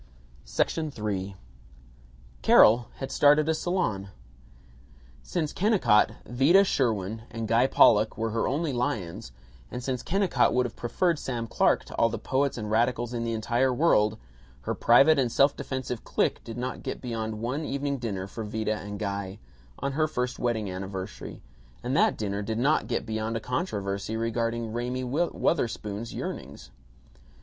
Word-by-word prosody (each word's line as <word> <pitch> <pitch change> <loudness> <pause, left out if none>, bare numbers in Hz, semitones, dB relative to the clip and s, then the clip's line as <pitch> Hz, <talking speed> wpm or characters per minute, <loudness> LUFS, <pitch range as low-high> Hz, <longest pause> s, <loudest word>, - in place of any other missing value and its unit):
III 100 -2 -3 1.1
Carol 115 - +6
had 135 0 -6
started 150 +1 +4
a 160 - +3
salon. 155 - -1 1.1
Since 160 -4 -3
Kennicott, 175 - +3
Vida 140 +11 +5
Sherwin, 110 - 0
and 115 -1 -5
Guy 115 +4 +4
Pollock 110 -4 +4
were 115 0 -1
her 115 +1 0
only 145 +2 -1
lions, 115 -6 -3 0.4
and 125 - -6
since 130 -1 -2
Kennicott 185 -11 +1
would 125 0 +3
have 120 - -6
preferred 165 +7 0
Sam 120 -3 -3
Clark 115 - +2
to - - -9
all 115 - +4
the 115 - -4
poets 135 +5 0
and 105 -2 -4
radicals 120 +1 +1
in 120 -1 -2
the 115 0 -2
entire 120 +4 +1
world, 110 -7 +3 0.4
her - - -2
private 140 +6 +5
and 125 -3 +1
self 140 +3 +4
defensive 130 -3 -4
clique - - 0
did 115 0 -8
not 125 +1 -4
get - - -5
beyond 110 -3 -4
one 125 +7 -2
evening 140 -1 -2
dinner 100 -6 -3
for 110 +3 -7
Vida 110 0 -2
and 105 0 -7
Guy, 100 -1 -4 0.4
on 140 - -2
her 155 +3 +1
first 125 -4 -3
wedding 115 -4 -1
anniversary; 95 +1 -6 0.4
and - - -1
that - - +3
dinner 100 -1 -2
did 110 +2 -3
not 140 +6 +2
get - - -2
beyond 110 0 -2
a - - -3
controversy 105 - -3
regarding 115 0 -2
Raymie 125 +2 -2
Wutherspoon's 120 -6 -1
yearnings. 65 -2 -7
115 Hz, 155 wpm, -27 LUFS, 105-135 Hz, 1.1 s, Carol